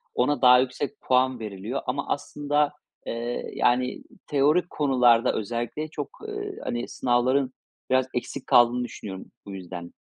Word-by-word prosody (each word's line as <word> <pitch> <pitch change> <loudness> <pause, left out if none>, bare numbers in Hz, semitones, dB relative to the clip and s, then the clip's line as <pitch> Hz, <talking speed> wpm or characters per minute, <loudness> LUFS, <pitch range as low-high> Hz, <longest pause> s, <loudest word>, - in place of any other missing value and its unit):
ona 125 +1 +1
daha 125 -1 +8
yüksek 130 +2 -2
puan 130 0 +2
veriliyor 105 +4 -4
ama 140 +3 -2
aslında, 145 0 0 0.3
eee, 120 +1 -3
yani, 125 +1 +1 0.2
teorik 150 +5 +2
konularda 125 -5 +3
özellikle 120 +7 -3
çok, 155 - -5 0.2
eee, 410 -2 -5
hani, 120 - -3
sınavların 130 +2 +1 0.4
biraz 130 0 +3
eksik 130 +2 -4
kaldığını 120 +1 +5
düşünüyorum, 95 -5 -8 0.2
bu 100 - -8
yüzden. 90 -2 -8
125 Hz, 130 wpm, -26 LUFS, 120-140 Hz, 0.4 s, daha